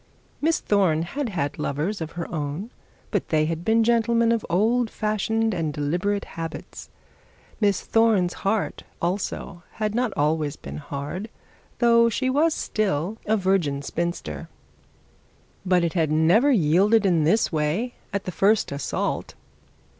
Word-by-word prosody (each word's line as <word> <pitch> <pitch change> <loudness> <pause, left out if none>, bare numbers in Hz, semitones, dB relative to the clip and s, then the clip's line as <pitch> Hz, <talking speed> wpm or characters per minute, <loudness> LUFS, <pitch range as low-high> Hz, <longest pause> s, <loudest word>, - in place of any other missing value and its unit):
Miss 320 +2 +2
Thorne 185 -6 +2
had 270 +8 -3
had 145 -8 -3
lovers 165 +8 -2
of 160 - -5
her 175 -1 -4
own, 155 +8 -4 0.4
but - - -1
they 155 -1 +2
had 165 +1 -3
been 225 +3 +3
gentlemen 230 0 +3
of 230 -2 +1
old 225 +7 +2
fashioned 220 +1 0
and 165 -4 -1
deliberate 175 +8 -1
habits. 165 -1 -7 0.7
Miss 200 -3 +2
Thorne's 220 -6 +2
heart 205 +2 -1 0.2
also 180 0 -3
had 215 -1 -2
not 245 -1 0
always 150 0 +1
been - - -8
hard, 145 +8 -5 0.5
though 235 -1 +5
she 260 +3 0
was 310 +4 +2
still 205 0 -1
a 220 +1 +3
virgin 180 -8 +1
spinster; 170 +4 -4 1.2
but 180 -1 +3
it 170 - 0
had 160 -4 +1
never 175 - +4
yielded 200 - +4
in 170 -5 +3
this 215 +9 +2
way 165 +11 -1 0.2
at 200 -2 -2
the 185 - -4
first 200 +3 +2
assault. 140 0 -3
195 Hz, 140 wpm, -24 LUFS, 160-225 Hz, 1.2 s, though